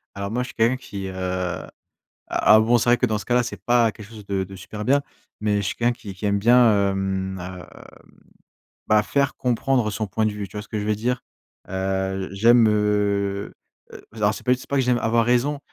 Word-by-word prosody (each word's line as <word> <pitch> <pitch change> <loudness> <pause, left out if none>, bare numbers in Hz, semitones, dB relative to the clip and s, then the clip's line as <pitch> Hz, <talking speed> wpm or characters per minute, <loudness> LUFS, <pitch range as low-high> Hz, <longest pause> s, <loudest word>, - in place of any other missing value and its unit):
Alors 100 0 -4
moi, 125 +3 -1
je 125 - -5
suis - - -11
quelqu'un 115 +3 +2
qui, 100 -6 -7
heu 95 - -7
a 90 -1 -3 0.6
alors 110 +1 +5
bon 120 +1 +4
c'est 120 +1 +2
vrai 120 - +6
que 125 - +1
dans 110 -2 -1
ce - - -8
cas 120 - 0
là, 125 - +4
c'est 105 -5 -7
pas 120 0 +3
quelque 105 -1 -12
chose 110 -3 -12
de 100 -1 -1
de 95 +1 -8
super 105 +3 -7
bien, 140 +4 +3 0.4
mais 105 -1 +1
je - - -1
suis - - -4
quelqu'un 120 +1 +1
qui 110 -4 -9
qui 95 +2 -5
aime 100 0 +1
bien, 110 -3 +5
hem, 95 -1 -2
hem, 90 0 -8 1.2
bah, 105 0 +4
faire 140 +4 0
comprendre 125 -1 +1
son 110 +1 -3
point 110 +3 -1
de 110 - +1
vue, 105 -1 -5
tu 105 - -9
vois - - -3
ce - - -17
que 110 - -4
je 105 - -4
veux 105 0 +1
dire? 120 +3 -2 0.5
Heu, 95 0 -2
j - - -8
j'aime, 120 0 +6
heu, 105 -1 0 0.4
heu, - - -10
z - - -13
alors 105 0 +2
c'est - - -9
pas 125 - +2
du 125 - +3
c'est - - -12
pas 140 - -1
que 135 - +3
j'aime 125 -1 +2
avoir 115 +1 +2
raison, 125 +5 +1
105 Hz, 250 wpm, -23 LUFS, 100-120 Hz, 1.2 s, vrai